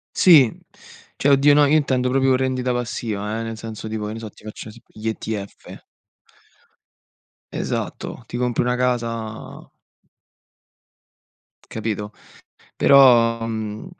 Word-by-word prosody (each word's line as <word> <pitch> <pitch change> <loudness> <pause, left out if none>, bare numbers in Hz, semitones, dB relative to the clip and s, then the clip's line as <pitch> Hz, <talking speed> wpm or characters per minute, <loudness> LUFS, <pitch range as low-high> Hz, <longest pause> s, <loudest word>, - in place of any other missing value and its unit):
Sì, 150 -10 +6 0.7
cioè 140 - 0
oddio 140 +1 +5
no, 145 0 +5
io 150 +2 +3
intendo 130 -4 +1
proprio 135 0 +2
rendita 130 -1 -1
passiva, 110 -3 -3
eh, - - -3
nel 115 0 -5
senso 110 -1 -8
tipo 110 -1 -4
che 105 - -5
ne - - -7
so 110 -1 -7
ti - - -21
faccio 110 0 -9
un - - -8
esempio 115 -1 -17
gli 110 - -2
ETF. 110 -2 -6 1.7
Esatto, - - -4
ti - - -6
compri 125 -1 0
una 125 0 0
casa. 115 -3 -3 2.0
Capito, 105 -2 -4 0.6
però, 120 -4 +5
mhmm, 110 -1 -5
115 Hz, 130 wpm, -21 LUFS, 110-130 Hz, 2.0 s, Sì